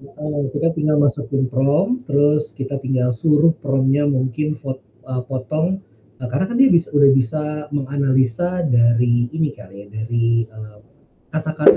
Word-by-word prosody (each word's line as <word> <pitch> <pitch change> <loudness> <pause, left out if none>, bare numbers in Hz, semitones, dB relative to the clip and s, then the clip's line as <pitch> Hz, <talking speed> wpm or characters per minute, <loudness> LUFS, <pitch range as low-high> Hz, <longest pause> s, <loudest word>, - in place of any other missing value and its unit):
Heeh, 145 +1 -5
kita 165 +3 +1
tinggal 155 -2 0
masukin 145 -1 +1
prompt 155 - +1
terus 145 +1 +1
kita 135 0 -4
tinggal 130 -2 0
suruh 150 +6 +3
prompt-nya 135 +1 +1
mungkin 140 +3 -1
fot 130 -2 -6 0.2
eee, 130 -1 -4
potong. 155 +8 -2 0.3
Eee, 125 -2 -6
karena 140 +9 0
kan 240 - -3
dia 270 +1 +6
bis 170 -1 +3
udah 145 -1 +5
bisa 135 +3 +1 0.3
menganalisa 140 +5 0
dari 120 -2 +3
ini 160 +1 -2
kali 100 -7 -14
ya - - -18
dari, 115 +1 0
eee, 110 -1 -12 0.6
kata-kata 155 0 +4
140 Hz, 150 wpm, -20 LUFS, 125-150 Hz, 0.6 s, dia